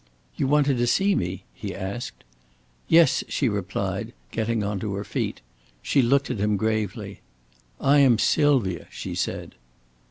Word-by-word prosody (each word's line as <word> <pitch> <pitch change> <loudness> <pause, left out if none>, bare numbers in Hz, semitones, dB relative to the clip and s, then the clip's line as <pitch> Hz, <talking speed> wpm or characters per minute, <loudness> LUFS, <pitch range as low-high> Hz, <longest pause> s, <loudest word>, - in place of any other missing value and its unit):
"You - - 0
wanted 145 -2 +3
to 120 - +2
see 195 +10 +3
me?" 90 - -2
he 100 -3 -6
asked. 100 +5 -6 0.6
"Yes," 165 0 +5
she 140 - 0
replied, 100 -4 -3 0.2
getting 110 -1 -1
on 100 -1 -2
to 100 -1 -3
her 100 - -3
feet. - - -3 0.4
She 140 - +3
looked 135 +3 +2
at 120 - -3
him 105 0 +1
gravely. 110 -2 -2 0.6
"I 145 +1 +4
am 130 -5 +5
Sylvia," 120 - +2
she - - -6
said. - - -3
110 Hz, 150 wpm, -25 LUFS, 100-140 Hz, 0.6 s, Yes